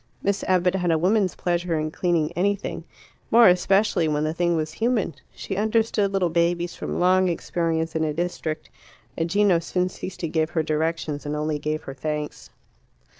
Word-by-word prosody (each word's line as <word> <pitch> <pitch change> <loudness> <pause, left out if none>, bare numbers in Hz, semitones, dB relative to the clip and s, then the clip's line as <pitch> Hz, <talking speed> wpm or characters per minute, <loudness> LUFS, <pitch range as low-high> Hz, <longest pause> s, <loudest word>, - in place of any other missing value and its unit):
Miss 200 0 0
Abbott 185 -1 +2
had 180 -2 0
a 165 - +3
woman's 190 +3 +2
pleasure 175 -1 -1
in 155 0 -2
cleaning 170 -2 0
anything 200 +3 -2 0.4
more 235 0 +7
especially 185 -1 +3
when 150 0 0
the 155 +1 -1
thing 175 0 +1
was 155 -1 -2
human. 220 0 0 0.2
She 195 - -5
understood 215 -1 +1
little 185 -4 +1
babies 170 +1 +1
from - - -4
long 185 +1 +4
experience 165 -1 -1
in 160 - +1
a 155 - 0
district, 160 -1 -3 0.4
and 165 0 -1
Gino 200 -2 +3
soon 180 +2 -1
ceased 185 0 -8
to 170 - -1
give 160 0 0
her 160 -2 0
directions, 155 -1 -2
and 150 0 -3
only 150 0 -1
gave 155 +1 -3
her 135 - -7
thanks. 150 +2 -5
170 Hz, 175 wpm, -24 LUFS, 155-185 Hz, 0.4 s, more